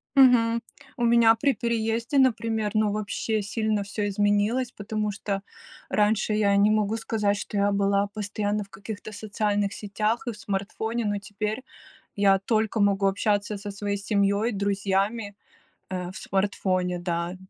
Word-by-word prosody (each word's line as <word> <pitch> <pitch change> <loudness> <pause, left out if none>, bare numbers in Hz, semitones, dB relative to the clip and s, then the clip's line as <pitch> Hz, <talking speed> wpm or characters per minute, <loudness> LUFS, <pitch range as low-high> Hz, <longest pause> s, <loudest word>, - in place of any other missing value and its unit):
Мгм. 235 -3 +5 0.4
У 240 - -1
меня 230 -1 +6
при 275 +4 +2
переезде, 235 +2 -1
например, 225 -5 +2
ну 215 -1 +2
вообще 215 +1 -2
сильно 215 0 -1
всё 205 +1 -3
изменилось, 205 +5 +1
потому 210 0 -3
что 195 0 -3 0.5
раньше 215 +1 +2
я 205 -1 +3
не 205 +1 +5
могу 215 +1 +1
сказать, 210 -2 0
что 205 - -5
я 200 0 +3
была 200 0 +2
постоянно 210 0 -2
в 200 - -17
каких-то 205 +2 -8
социальных 205 -1 -1
сетях 215 +4 -2
и - - 0
в 215 - -11
смартфоне, 215 +3 -3
но 205 -1 0
теперь 210 +4 -4 0.5
я 195 -1 +4
только 220 +2 0
могу 200 -1 +3
общаться 205 +1 0
со 205 +1 -6
своей 200 0 -3
семьей, 200 +2 +1
друзьями, 200 +1 -1 0.6
э, 180 -1 -4
в - - -9
смартфоне, 185 -2 -1
да. 170 0 -2
205 Hz, 145 wpm, -26 LUFS, 200-220 Hz, 0.6 s, меня